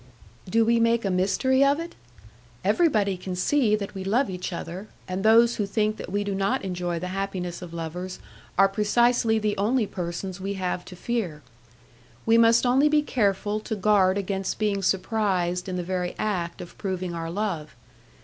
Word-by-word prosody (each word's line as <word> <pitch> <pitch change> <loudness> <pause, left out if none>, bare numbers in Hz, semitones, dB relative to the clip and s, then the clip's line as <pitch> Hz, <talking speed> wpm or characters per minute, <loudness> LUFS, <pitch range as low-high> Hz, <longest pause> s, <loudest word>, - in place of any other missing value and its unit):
"Do 225 +3 +3
we 235 +1 +3
make 230 -1 +2
a 195 - +1
mystery 260 +9 +2
of 280 +2 +3
it? 335 +1 -6 0.7
Everybody 210 - +2
can 185 0 -5
see 220 +3 +2
that 200 -2 -5
we 190 -1 -5
love 225 +4 +1
each 180 0 -4
other, 175 +4 -6 0.2
and 185 +1 -3
those 230 +2 +5
who 205 - -1
think 215 +1 0
that - - -7
we 205 +1 0
do 200 -1 -2
not 195 +1 0
enjoy 175 -2 -2
the 180 +2 -4
happiness 190 -3 -3
of 175 -2 -8
lovers 170 +3 -5 0.4
are 195 +1 +7
precisely 225 +3 +2
the 210 -1 0
only 220 +4 +2
persons 180 0 -5
we 200 +1 -3
have 180 -1 -2
to 180 - -10
fear. 180 -8 -3 0.8
We 225 - +4
must 230 +1 +5
only 265 +4 +4
be 300 0 +3
careful 205 -4 0
to 220 +1 -4
guard 200 -2 +3
against 195 -1 -2
being 205 -2 0
surprised 190 -2 0
in 185 - -3
the 180 - -2
very 180 0 -2
act 180 -6 -2
of 175 - -11
proving 185 -3 -3
our 165 -1 -4
love. 170 - -3
195 Hz, 180 wpm, -25 LUFS, 180-220 Hz, 0.8 s, are